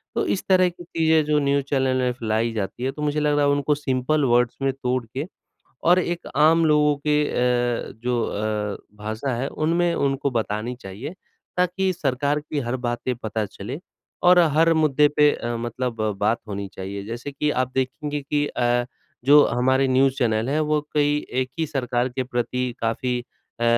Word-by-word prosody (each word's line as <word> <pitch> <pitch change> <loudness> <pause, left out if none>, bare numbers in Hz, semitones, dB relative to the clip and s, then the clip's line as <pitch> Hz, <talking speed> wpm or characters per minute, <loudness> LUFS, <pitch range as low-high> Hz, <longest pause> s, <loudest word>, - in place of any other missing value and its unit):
तो 435 - +1
इस 190 - -3
तरह 185 -1 +5
की 175 0 -12
चीज़ें 160 -2 +2
जो 150 0 +2
न्यूज़ 140 0 +1
चैनल 130 -2 +1
में 125 -1 +1
फैलाई 115 -1 -1
जाती 105 +3 -4
है 130 - 0
तो 150 - -9
मुझे 150 0 0
लग 150 -1 +2
रहा 145 - +3
है 145 - +3
उनको 145 +1 +1
सिंपल 140 +1 0
वर्ड्स 120 -1 +2
में 135 0 +2
तोड़ 130 -2 -2
के 130 +6 -5 0.6
और 175 +2 +6
एक 175 -1 -2
आम 160 +3 +5
लोगों 150 -1 +3
के 150 0 +3 0.7
अ, - - -9
जो 125 -1 +1
अ, 105 -1 -2 0.2
भाषा 110 +5 -3
है 130 +4 -2
उनमें 170 +3 +1
उनको 140 -2 0
बतानी 115 0 -2
चाहिए 110 - -7 0.4
ताकि 180 +1 +1
सरकार 145 -2 0
की 150 0 -5
हर 120 0 -2
बातें 120 +1 -2
पता 110 -1 -3
चले 105 +7 -7 0.5
और 180 0 +7 0.2
हर 165 +1 +5
मुद्दे 150 -2 +4
पे 150 0 +6
अ, 120 0 -3
मतलब 120 0 -4 0.2
बात 110 +3 +2
होनी 100 -1 -4
चाहिए। 100 +1 -6
जैसे 120 +6 -6
कि 150 +2 0
आप 130 -2 0
देखेंगे 145 +3 -2
कि 145 +1 0
अ, 120 -2 +1 0.4
जो 145 +2 +7
हमारे 130 +2 +2
न्यूज़ 130 +1 +3
चैनल 110 -2 +1
हैं 150 +3 +1
वो 150 0 +1
कई 145 0 +3 0.3
एक 130 - -8
ही 160 - 0
सरकार 125 -3 -1
के 130 +1 -3
प्रति 125 0 -2
काफ़ी 125 +2 -1 0.4
अ, - - +1
135 Hz, 185 wpm, -23 LUFS, 120-150 Hz, 0.7 s, और